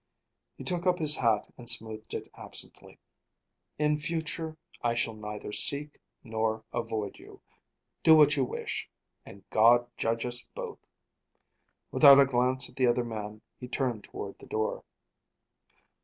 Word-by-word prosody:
He - - -8
took 180 0 0
up 180 -1 +3
his 150 -3 +3
hat 115 -4 +1
and 120 - -2
smoothed 110 0 -1
it - - -5
absently. - - -4 0.8
"In 150 0 +1
future 160 0 -3 0.2
I 120 -1 0
shall 115 -1 -1
neither 105 -1 -7
seek, 145 +8 +1 0.2
nor 110 -1 -2
avoid 110 -4 -3
you. - - -14 0.6
Do 160 - +7
what 150 -1 +6
you 135 - +1
wish 125 - -4 0.4
and 100 - -14
God 120 +2 +5
judge 115 +1 -1
us 120 0 +3
both." - - -6 1.1
Without 140 -2 +8
a 140 - +7
glance 130 0 +1
at - - -17
the 130 -1 +3
other 120 0 +1
man, 105 -2 -7 0.2
he 125 - -7
turned 125 -5 -2
toward 100 - -8
the - - -14
door. 110 0 -2
120 Hz, 145 wpm, -29 LUFS, 110-145 Hz, 1.1 s, Without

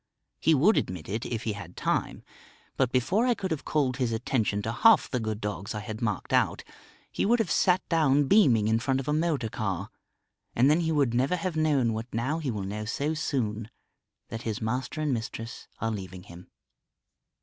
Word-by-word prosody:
He 160 - +4
would 175 +11 +4
admit 90 -4 -2
it, 110 +5 -3
if 115 -2 -3
he 110 - -1
had 90 -4 -10
time. - - -1 0.5
But 130 -2 +1
before 185 - +2
I 245 - +3
could 190 -4 -4
have 160 - -2
called 135 -5 0
his 125 -4 0
attention 110 -2 -1
to 110 - -2
half 220 - +5
the 125 - -2
good 110 -2 -3
dogs 105 0 -4
I 105 - -3
had 110 +1 -7
marked 105 -5 -2
out, - - +2 0.5
he - - -1
would 235 +4 +4
have 220 -9 -1
sat 180 +3 +2
down 145 -4 +3
beaming 135 - +4
in 110 +1 +2
front 130 +2 0
of 135 - -6
a 150 - +1
motor 155 -6 0
car... 100 -3 -3 0.6
and 130 +5 +5
then 155 - +3
he 165 -1 0
would 140 -6 +2
never 130 +8 +2
have 180 -1 -3
known 145 -7 +2
what 110 +2 -5
now 130 +8 -1
he 150 -5 -3
will 105 -5 -3
know 105 +2 -4
so 140 +7 -1
soon 115 -8 -2 0.6
that 115 +1 -5
his 110 -3 -3
master 125 +7 -3
and 150 -3 +1
mistress 115 0 -5
are 115 - -1
leaving 95 -3 -7
him. 85 +1 -13
125 Hz, 205 wpm, -28 LUFS, 110-155 Hz, 0.6 s, half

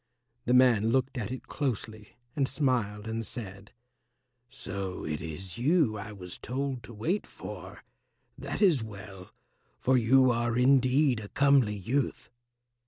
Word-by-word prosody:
The 125 - +3
man 120 -4 +5
looked 130 +2 +1
at 115 +1 -4
it 130 - -6
closely 110 -6 -4 0.2
and 140 -2 +1
smiled 120 -7 -1
and 115 0 -2
said, 100 -2 -8 0.8
"So 95 -3 -6
it 75 -1 -3
is 85 +6 -6
you 145 -3 +3
I 105 +1 -6
was 90 -4 -9
told 130 +1 -3
to 115 - -11
wait 170 - -1
for. - - -9 0.5
That - - -3
is 165 - +5
well, 100 -3 -9 0.5
for 130 - +3
you 130 +2 +5
are 120 0 0
indeed 130 0 +4
a 105 - -7
comely 135 -4 +3
youth." 115 +2 -2
120 Hz, 140 wpm, -29 LUFS, 105-130 Hz, 0.8 s, man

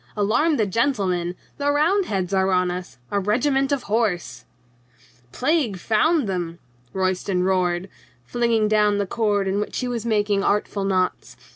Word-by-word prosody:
Alarm 245 +10 +2
the 215 - +2
gentlemen! 190 -6 0 0.2
The 285 0 +1
Roundheads 290 - +1
are 190 0 +2
on 180 -1 +2
us! 180 0 -7
A 205 - +1
regiment 270 +7 +1
of 280 -3 0
horse 205 -5 -1 0.4
!" 120 0 -30
"Plague 260 - 0
'found 235 - +2
them 175 -3 -3 0.2
!" 125 0 -35
Royston 185 -1 -1
roared, 180 -1 0 0.4
flinging 230 - +1
down 210 -1 +3
the 200 - 0
cord 205 -1 0
in 195 +1 0
which 210 - -3
he 250 - -2
was 240 -3 -3
making 205 -3 +1
artful 200 -1 0
knots. 185 -2 -1
205 Hz, 155 wpm, -23 LUFS, 185-235 Hz, 0.4 s, down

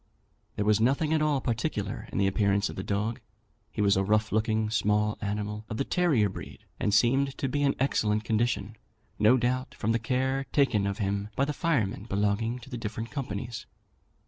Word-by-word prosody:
There 105 - -1
was 105 0 +4
nothing 140 +6 +2
at 155 - +2
all 150 -3 +2
particular 115 -3 -2
in - - -4
the 100 - +3
appearance 100 +1 +2
of - - -7
the - - -4
dog; 105 +3 -2 0.5
he 105 - -2
was 100 -1 +4
a 95 - +2
rough 110 +2 +1
looking 110 0 +1
small 105 -1 +1
animal, 105 +1 -3
of 110 - -4
the 135 - +1
terrier 155 - +2
breed, 95 - -9
and 105 - +1
seemed 130 +6 +3
to 140 - -1
be 145 +2 -1
in 140 -1 +2
excellent 110 -5 +1
condition, 110 -1 -1 0.4
no 110 +5 +6
doubt 130 +1 -1
from 110 - -1
the 115 - +1
care 130 +3 -1
taken 110 -9 +2
of 100 0 -2
him 100 -1 -2
by 140 - +2
the 150 - -2
firemen 120 - 0
belonging 105 +3 0
to 120 - -12
the 125 - -3
different 110 +1 -5
companies. 120 -4 -5
110 Hz, 195 wpm, -28 LUFS, 105-130 Hz, 0.5 s, no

